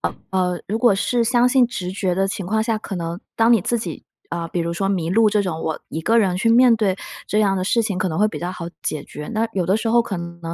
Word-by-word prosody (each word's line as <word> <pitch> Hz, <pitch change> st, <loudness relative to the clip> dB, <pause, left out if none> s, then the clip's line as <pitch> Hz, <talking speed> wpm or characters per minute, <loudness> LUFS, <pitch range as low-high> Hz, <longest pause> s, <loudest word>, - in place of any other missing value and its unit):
呃， -, -, -2 dB, 0.2 s
呃， 180 Hz, -2 st, 0 dB
如 215 Hz, +3 st, -2 dB
果 230 Hz, -3 st, +4 dB
是 235 Hz, +5 st, +1 dB
相 240 Hz, +1 st, +3 dB
信 250 Hz, 0 st, +4 dB
直 185 Hz, -6 st, -5 dB
觉 190 Hz, -2 st, -1 dB
的 195 Hz, +1 st, +1 dB
情 195 Hz, -1 st, -4 dB
况 220 Hz, +3 st, +1 dB
下， 225 Hz, -1 st, 0 dB
可 205 Hz, -2 st, -6 dB
能 170 Hz, +1 st, -4 dB, 0.2 s
当 225 Hz, +1 st, +4 dB
你 230 Hz, -, +5 dB
自 235 Hz, +6 st, 0 dB
己， 225 Hz, -, -6 dB, 0.3 s
呃， 165 Hz, -1 st, -3 dB
比 175 Hz, -, -2 dB
如 170 Hz, 0 st, -2 dB
说 195 Hz, +3 st, -1 dB
迷 175 Hz, -4 st, -1 dB
路 220 Hz, +2 st, +4 dB
这 210 Hz, 0 st, +2 dB
种， 165 Hz, -4 st, -3 dB
我 160 Hz, -1 st, -2 dB
一 160 Hz, -, -4 dB
个 225 Hz, +8 st, +2 dB
人 195 Hz, -6 st, +3 dB
去 230 Hz, +4 st, +1 dB
面 240 Hz, +1 st, +6 dB
对 205 Hz, -4 st, 0 dB, 0.3 s
这 210 Hz, -, +1 dB
样 200 Hz, -2 st, +2 dB
的 185 Hz, -, -1 dB
事 230 Hz, +5 st, +2 dB
情 200 Hz, -4 st, -2 dB
可 185 Hz, -, 0 dB
能 160 Hz, -1 st, -3 dB
会 210 Hz, -, +4 dB
比 215 Hz, -, -5 dB
较 175 Hz, -, -3 dB
好 180 Hz, -2 st, -6 dB, 0.2 s
解 155 Hz, -2 st, -3 dB
决。 150 Hz, 0 st, -8 dB
那 220 Hz, +1 st, +1 dB
有 185 Hz, -3 st, -1 dB
的 190 Hz, +3 st, +3 dB
时 225 Hz, -, -3 dB
候 235 Hz, +1 st, +4 dB
可 205 Hz, -4 st, -3 dB
能 170 Hz, 0 st, -7 dB
195 Hz, 310 characters per minute, -21 LUFS, 175-225 Hz, 0.3 s, 面